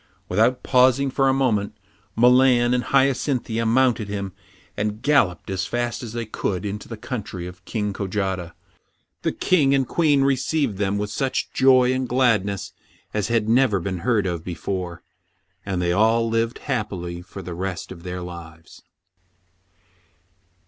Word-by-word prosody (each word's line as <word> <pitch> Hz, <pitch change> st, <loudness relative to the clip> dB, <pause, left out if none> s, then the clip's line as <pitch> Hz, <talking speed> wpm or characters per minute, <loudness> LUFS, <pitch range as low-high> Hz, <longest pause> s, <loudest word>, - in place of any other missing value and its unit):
Without 115 Hz, +8 st, +2 dB
pausing 130 Hz, +1 st, +3 dB
for 135 Hz, 0 st, +2 dB
a -, -, +4 dB
moment, 110 Hz, -6 st, 0 dB, 0.4 s
Milan 125 Hz, 0 st, +5 dB
and 125 Hz, -1 st, 0 dB
Hyacinthia 130 Hz, -4 st, +1 dB
mounted 120 Hz, -2 st, +2 dB
him 100 Hz, -2 st, -4 dB, 0.4 s
and 105 Hz, +1 st, -3 dB
galloped 100 Hz, -, +2 dB
as 95 Hz, 0 st, -2 dB
fast 120 Hz, 0 st, -2 dB
as 115 Hz, -3 st, -7 dB
they 115 Hz, -1 st, -3 dB
could 100 Hz, -2 st, -3 dB
into 105 Hz, +1 st, -5 dB
the 115 Hz, -, -7 dB
country 105 Hz, -6 st, -5 dB
of 90 Hz, 0 st, -10 dB
King 105 Hz, -3 st, -2 dB
Kojata. 95 Hz, -3 st, -3 dB, 0.7 s
The -, -, 0 dB
King 145 Hz, -7 st, +2 dB
and 135 Hz, -2 st, +1 dB
Queen 145 Hz, -3 st, +3 dB
received 135 Hz, -4 st, 0 dB
them 100 Hz, 0 st, 0 dB
with 105 Hz, 0 st, -3 dB
such 135 Hz, +4 st, -2 dB
joy 130 Hz, -1 st, +5 dB
and 130 Hz, -1 st, -2 dB
gladness 110 Hz, -6 st, +1 dB, 0.4 s
as 105 Hz, -2 st, -1 dB
had 115 Hz, -2 st, +1 dB
never 115 Hz, -3 st, +3 dB
been 95 Hz, +1 st, -3 dB
heard 105 Hz, +2 st, +1 dB
of 85 Hz, -3 st, -3 dB
before, 90 Hz, 0 st, -5 dB, 0.6 s
and 95 Hz, -2 st, -1 dB
they 90 Hz, -1 st, +1 dB
all 110 Hz, +5 st, +3 dB
lived 115 Hz, +1 st, 0 dB
happily 95 Hz, -9 st, -3 dB
for 95 Hz, +2 st, -10 dB
the 90 Hz, 0 st, -6 dB
rest 90 Hz, +1 st, -4 dB
of 90 Hz, -3 st, -9 dB
their 90 Hz, +1 st, -5 dB
lives. 85 Hz, -2 st, -11 dB
110 Hz, 150 wpm, -23 LUFS, 95-125 Hz, 0.7 s, Milan